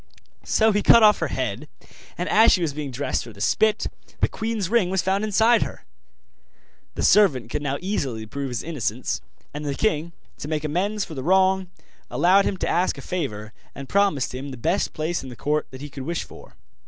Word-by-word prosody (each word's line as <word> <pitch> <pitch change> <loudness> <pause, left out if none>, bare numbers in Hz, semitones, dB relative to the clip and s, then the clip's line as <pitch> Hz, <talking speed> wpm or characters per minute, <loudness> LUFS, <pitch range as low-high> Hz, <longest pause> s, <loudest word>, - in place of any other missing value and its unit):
So 220 0 +3
he 205 0 +1
cut 230 +2 +7
off 210 -1 +6
her - - 0
head, - - -3 0.5
and - - -2
as 220 +2 +6
she 180 - +3
was 155 -4 -1
being 150 -1 -5
dressed 130 +2 -2
for 115 - -10
the 100 - -16
spit, 215 - +2 0.3
the - - +3
queen's 220 -4 -3
ring 220 -3 +2
was 190 -1 0
found 190 +2 0
inside 220 +2 +3
her. - - -5 1.1
The - - -2
servant 140 - +4
could 150 - -2
now 140 -1 -2
easily 135 - -2
prove 140 +5 -5
his 125 -3 -4
innocence; 150 -9 -3 0.3
and 150 +1 -5
the 140 -2 -2
king, 170 -4 -1 0.3
to - - -6
make 155 -1 -2
amends 195 +7 -1
for 160 - -10
the 135 - -5
wrong, 190 +3 +2 0.4
allowed 190 +3 +4
him 195 - -1
to - - -2
ask 180 +2 +1
a - - -7
favour, 110 - -4 0.2
and 135 - -8
promised 195 -10 +1
him 135 +2 -6
the 130 - -8
best 115 - 0
place 160 +3 -2
in 130 - -9
the 125 - -9
court 150 +5 -1
that 130 0 -11
he 145 - -7
could 135 - -7
wish 170 0 -2
for. - - -14
165 Hz, 210 wpm, -23 LUFS, 140-200 Hz, 1.1 s, cut